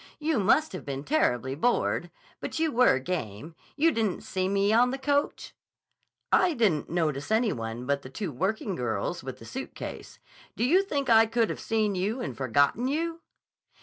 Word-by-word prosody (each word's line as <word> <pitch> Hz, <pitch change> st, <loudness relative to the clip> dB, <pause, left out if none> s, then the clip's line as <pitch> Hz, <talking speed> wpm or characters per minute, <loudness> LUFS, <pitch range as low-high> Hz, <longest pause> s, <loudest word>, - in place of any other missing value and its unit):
"You 305 Hz, -4 st, 0 dB
must 270 Hz, +11 st, +3 dB
have -, -, -6 dB
been 140 Hz, -1 st, -5 dB
terribly 130 Hz, -, +1 dB
bored. 205 Hz, -, 0 dB, 0.3 s
But -, -, -5 dB
you 320 Hz, -1 st, +1 dB
were 245 Hz, -, +4 dB
game. 140 Hz, -, -5 dB, 0.2 s
You 325 Hz, +3 st, +3 dB
didn't 220 Hz, -, -1 dB
see 185 Hz, -1 st, -2 dB
me 200 Hz, +1 st, +2 dB
on 245 Hz, +2 st, +5 dB
the 265 Hz, -, -3 dB
coach?" 285 Hz, +2 st, -1 dB, 0.8 s
"I 355 Hz, -4 st, +4 dB
didn't 200 Hz, -, +1 dB
notice 155 Hz, -4 st, -1 dB
any 220 Hz, -1 st, +2 dB
one 115 Hz, +1 st, -5 dB
but 140 Hz, +1 st, 0 dB
the 130 Hz, -, -10 dB
two 190 Hz, +4 st, -4 dB
working 190 Hz, -, -2 dB
girls 120 Hz, -8 st, -2 dB
with -, -, -6 dB
the -, -, -13 dB
suitcase. -, -, -7 dB, 0.4 s
Do 225 Hz, -, -1 dB
you 340 Hz, +10 st, +5 dB
think 285 Hz, -9 st, -2 dB
I 225 Hz, -2 st, +6 dB
could 230 Hz, 0 st, +1 dB
have -, -, -6 dB
seen 215 Hz, -2 st, 0 dB
you 200 Hz, +7 st, -1 dB
and 245 Hz, -, -4 dB
forgotten 140 Hz, -, +1 dB
you?" 330 Hz, +4 st, -2 dB
215 Hz, 180 wpm, -27 LUFS, -, 0.8 s, I